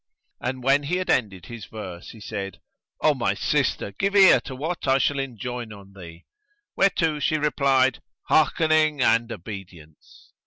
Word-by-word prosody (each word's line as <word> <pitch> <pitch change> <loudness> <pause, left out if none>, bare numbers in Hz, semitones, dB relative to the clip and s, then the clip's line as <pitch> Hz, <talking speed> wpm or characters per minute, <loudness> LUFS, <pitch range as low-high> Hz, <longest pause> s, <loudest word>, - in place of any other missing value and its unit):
And 125 0 -4
when 135 +2 +4
he 145 +5 -2
had 185 0 -1
ended 95 -7 -1
his 115 -1 -9
verse, 95 -5 -8
he 110 - -12
said, 100 -3 -6 0.4
"O - - +4
my - - -1
sister, 100 - 0
give 195 - -2
ear 195 -2 +7
to 135 - -7
what 160 +4 -4
I 135 0 +4
shall 140 +1 +1
enjoin 125 -3 -5
on 100 -1 -13
thee"; 85 -3 -12 0.5
whereto 165 -6 +2
she 155 +1 +1
replied, 135 -4 +2 0.2
"Hearkening 155 -2 +2
and 115 +1 +2
obedience." 90 -6 -11
125 Hz, 155 wpm, -24 LUFS, 100-150 Hz, 0.5 s, ear